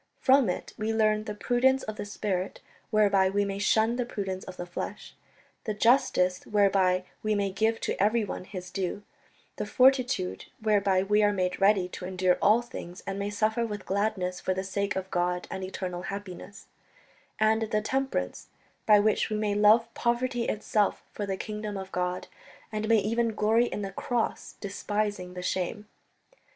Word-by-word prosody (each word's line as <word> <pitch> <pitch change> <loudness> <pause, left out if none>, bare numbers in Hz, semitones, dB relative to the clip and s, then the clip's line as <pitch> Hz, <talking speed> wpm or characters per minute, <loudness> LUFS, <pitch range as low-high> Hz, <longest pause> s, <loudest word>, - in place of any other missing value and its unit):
From 265 -5 +4
it 180 - -4
we 215 +1 0
learn 215 -1 +2
the 210 - -5
prudence 260 +4 +2
of 215 - -5
the 205 - -5
spirit 200 -2 -3 0.3
whereby 200 -3 +4
we 200 +1 +1
may 195 0 -3
shun 220 +3 +2
the 250 - +1
prudence 195 -5 -4
of 185 - -9
the 175 - -4
flesh, 175 - -6 0.5
the 215 -3 -2
justice 205 -6 +3
whereby 195 -3 +3 0.2
we 215 0 0
may 200 -1 0
give 220 +4 +1
to - - -2
everyone 210 -3 +1
his 180 -2 -8
due, 195 +1 -3 0.5
the - - -2
fortitude 255 -7 +2
whereby 200 -4 +2
we 210 +2 +3
are 205 0 +4
made 185 -1 -1
ready 195 -2 +4
to 180 - -7
endure 185 -1 +1
all 220 +4 +5
things 180 -6 -9
and 195 0 -4
may 200 +1 -2
suffer 215 +3 0
with 210 -4 -5
gladness 190 -2 -1
for 185 - -1
the 190 - -2
sake 200 +1 -2
of 190 0 -4
God 180 0 0
and 190 0 -4
eternal 185 -1 -4
happiness; 200 0 -7 0.7
and 220 0 +2
the 215 -1 +1
temperance 265 - -2 0.4
by 210 -1 +7
which 215 +1 +2
we 215 - -1
may 210 -1 0
love 220 +3 +4
poverty 240 0 0
itself 210 -1 0
for 205 - -4
the 190 -1 -2
kingdom 210 -1 -5
of 190 0 -7
God, 180 0 -2 0.4
and 215 0 -2
may 225 - +6
even 225 +2 0
glory 220 +3 +3
in 210 - -4
the 195 - -4
Cross, 235 +4 -2
despising 205 -2 -3
the 180 - -5
shame 190 +3 -2
205 Hz, 175 wpm, -28 LUFS, 190-220 Hz, 0.7 s, by